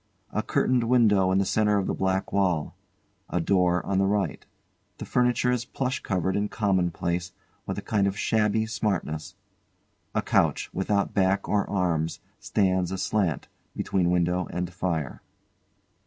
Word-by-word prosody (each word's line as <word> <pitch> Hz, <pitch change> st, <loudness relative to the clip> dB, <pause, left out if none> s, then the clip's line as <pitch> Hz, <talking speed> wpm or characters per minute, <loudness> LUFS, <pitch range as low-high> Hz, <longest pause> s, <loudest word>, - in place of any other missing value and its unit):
A -, -, 0 dB
curtained 125 Hz, -2 st, +1 dB
window 105 Hz, -6 st, +4 dB
in 95 Hz, -, +3 dB
the 100 Hz, -, +2 dB
centre 105 Hz, +1 st, +2 dB
of 100 Hz, -, 0 dB
the -, -, -1 dB
back 95 Hz, 0 st, -1 dB
wall. 90 Hz, -6 st, +1 dB, 0.5 s
A 90 Hz, -, 0 dB
door 90 Hz, 0 st, +2 dB
on 95 Hz, -1 st, 0 dB
the 95 Hz, -, +3 dB
right. 100 Hz, -5 st, -1 dB, 0.5 s
The -, -, -6 dB
furniture 125 Hz, 0 st, +2 dB
is 125 Hz, -1 st, 0 dB
plush 130 Hz, +1 st, -2 dB
covered 95 Hz, -1 st, -1 dB
and 105 Hz, 0 st, 0 dB
commonplace, 90 Hz, -3 st, -1 dB, 0.3 s
with -, -, -3 dB
a -, -, -4 dB
kind 100 Hz, -3 st, +1 dB
of 100 Hz, +1 st, -2 dB
shabby 110 Hz, 0 st, +1 dB
smartness. 105 Hz, -8 st, -2 dB, 0.8 s
A -, -, +1 dB
couch, -, -, +1 dB
without 100 Hz, +1 st, 0 dB
back 95 Hz, 0 st, +1 dB
or 105 Hz, -1 st, 0 dB
arms, 85 Hz, -5 st, 0 dB, 0.2 s
stands 95 Hz, -3 st, +1 dB
aslant, 95 Hz, -3 st, -1 dB, 0.3 s
between 90 Hz, -2 st, 0 dB
window 90 Hz, +1 st, +1 dB
and 90 Hz, 0 st, -4 dB
fire. 85 Hz, -7 st, -3 dB
95 Hz, 150 wpm, -26 LUFS, 90-105 Hz, 0.8 s, window